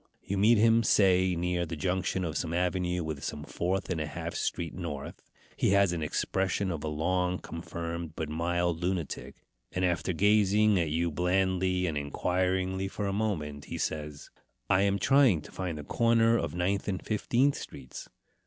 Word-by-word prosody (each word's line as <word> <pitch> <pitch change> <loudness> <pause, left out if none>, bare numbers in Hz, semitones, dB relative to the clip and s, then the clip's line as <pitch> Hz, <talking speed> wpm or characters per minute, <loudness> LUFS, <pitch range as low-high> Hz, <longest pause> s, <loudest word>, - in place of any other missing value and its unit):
You 100 - -3
meet 110 +4 +5
him, 115 +2 +5
say, 95 -4 +4
near 90 +1 0
the 80 -1 -4
junction 90 +3 -1
of 80 - -4
some 85 0 -2
avenue 90 0 0
with 80 -3 -5
some 75 - -4
Fourth 90 +4 -2
and 80 -3 -1
a 75 - -2
Half 75 - -5
Street 85 -2 -2
north. 75 -6 -6 0.3
He - - +2
has 100 -2 +4
the 85 -2 -2
expression 95 +5 -1
of 80 -4 -4
a - - -2
long 90 +4 0
confirmed 85 -1 -6
but 80 - -3
mild 85 +2 -1
lunatic; 90 -4 -3 0.4
and 90 0 0
after 85 0 0
gazing 105 +2 +4
at 85 -3 0
you 85 +2 0
blandly 90 +2 +1
and 80 -4 -1
inquiringly 95 +5 -1
for 100 +1 -4
a 100 - -1
moment, 80 -9 -2
he - - -5
says, 75 -2 -4 0.4
"I 95 - +5
am 100 0 +2
trying 130 - +4
to - - -13
find 90 -4 -4
the 75 - -6
corner 115 +5 +3
of 85 -8 -2
Ninth 95 +3 0
and 95 -3 -3
Fifteenth 125 +6 +2
streets." 65 - -9
90 Hz, 175 wpm, -29 LUFS, 85-95 Hz, 0.4 s, meet